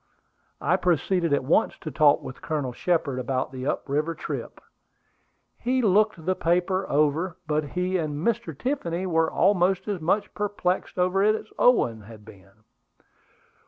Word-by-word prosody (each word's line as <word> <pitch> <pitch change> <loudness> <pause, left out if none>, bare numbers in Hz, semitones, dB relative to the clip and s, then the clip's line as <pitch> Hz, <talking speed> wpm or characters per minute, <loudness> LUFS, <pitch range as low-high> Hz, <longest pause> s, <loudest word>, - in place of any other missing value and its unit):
I - - +2
proceeded 175 0 +1
at 140 - +2
once 135 - +2
to 155 - -7
talk 145 -1 +4
with 130 - -9
Colonel 145 -5 -3
Shepard 155 -4 0
about 130 +1 -2
the 130 0 -5
up - - -2
river 150 +4 -1
trip. - - -6 1.0
He 255 +1 0
looked 210 -4 +2
the 185 - +2
paper 180 +2 0
over, 155 +5 +1
but 155 0 0
he 180 +5 -1
and 155 -3 -3
Mr. 235 0 -1
Tiffany 190 -10 -2
were 165 -3 +2
almost 190 0 +2
as 200 -5 -2
much 185 +6 0
perplexed 200 -4 -2
over 185 +2 +2
it 215 +1 +4
as 220 - -6
Owen 120 - +3
had 105 0 -13
been. 100 0 -17
170 Hz, 155 wpm, -25 LUFS, 145-190 Hz, 1.0 s, talk